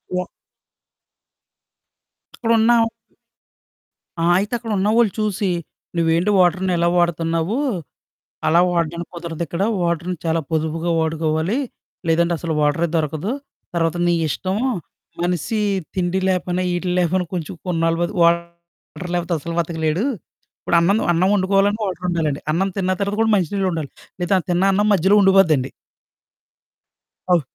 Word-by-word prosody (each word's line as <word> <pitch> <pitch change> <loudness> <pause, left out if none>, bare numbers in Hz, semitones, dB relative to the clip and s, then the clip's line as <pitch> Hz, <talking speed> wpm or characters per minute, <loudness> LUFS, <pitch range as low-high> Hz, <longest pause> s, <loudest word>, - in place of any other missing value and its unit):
వా 180 0 -1 2.1
అక్కడున్నా 230 0 +3 1.5
ఆ! - - +3
అయితే 205 +4 -2
అక్కడున్నావాళ్ళు 215 0 +1
చూసి, 210 -2 0 0.5
"నువ్వేంటి 165 +4 +2
వాటర్‌ని 180 +1 +2
ఇలా 170 0 +2
వాడుతున్నావు? 170 +3 0 0.9
అలా 170 +2 +5
వాడడానికి 170 0 -2
కుదరదిక్కడ. 170 +1 -4 0.2
వాటర్‌ని 170 +1 -1
చాలా 165 0 +1
పొదుపుగా 160 +1 -1
వాడుకోవాలి, 160 - 0 0.5
లేదంటే 170 +1 +2
అసలు 165 0 -3
వాటరే 165 +3 +1
దొరకదు. 155 - -1 0.4
తర్వాత 165 0 +1
నీ 175 - +3
ఇష్టం." 185 +6 -2 0.7
మనిషి 180 +5 -1 0.3
తిండి 185 0 0
లేకపోయినా, 180 -1 0
ఈటి 175 +1 -2
లేకపోయినా 180 +1 +1
కొంచెం 170 -2 -4
కొన్నాళ్ళు 165 -1 +1
బతుకు 175 +1 -1
వాటర్ 170 +1 -2
లేకపోతే 175 -1 -1
అస్సలు 165 +3 -5
బతకలేడు. 160 +3 -1 0.6
ఇప్పుడన్నం 175 +5 +3
అన్నం 175 +3 +2
వండుకోవాలన్నా 200 +2 +2
వాటరుండాలండి. 170 -5 -2
అన్నం 180 +5 +1
తిన్నా 185 -1 0
తర్వాత 200 +1 -1
కూడా 225 0 +3
మంచి 180 -6 0
నీళ్ళుండాలి. 175 -7 -1 0.3
లేదా 180 +2 +2
తిన్నా 175 +2 +2
అన్నం 205 +2 +2
మధ్యలో 195 +2 +4
ఉండిపోద్దండి. 170 -9 +4 1.6
అవు... 175 - +4
175 Hz, 115 wpm, -20 LUFS, 165-190 Hz, 2.1 s, అలా